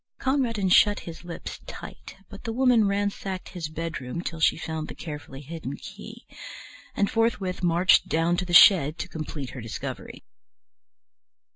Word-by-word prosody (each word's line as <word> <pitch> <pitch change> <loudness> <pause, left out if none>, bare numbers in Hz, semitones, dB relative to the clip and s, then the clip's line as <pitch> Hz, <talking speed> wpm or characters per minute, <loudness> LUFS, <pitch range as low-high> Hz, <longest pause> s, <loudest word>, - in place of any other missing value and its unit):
Conradin 245 -7 0
shut 205 +3 +5
his 165 0 -9
lips 175 -1 -7
tight, - - -9
but 200 -1 -12
the 225 - -3
Woman 245 -3 +4
ransacked 200 -2 -2
his 170 -4 -5
bedroom 160 -2 -5
till 165 -2 -5
she - - +3
found 160 -1 -4
the - - -8
carefully 145 -4 -8
hidden 150 -2 -6
key, - - -11 0.7
and 200 - +2
forthwith 215 -6 0
marched 175 +1 +4
down 165 +2 +1
to 180 - -1
the 175 - -6
shed 170 -4 +7
to - - -4
complete 155 -5 -6
her 130 - -8
discovery. 130 +4 -7
175 Hz, 150 wpm, -26 LUFS, 155-200 Hz, 0.7 s, shed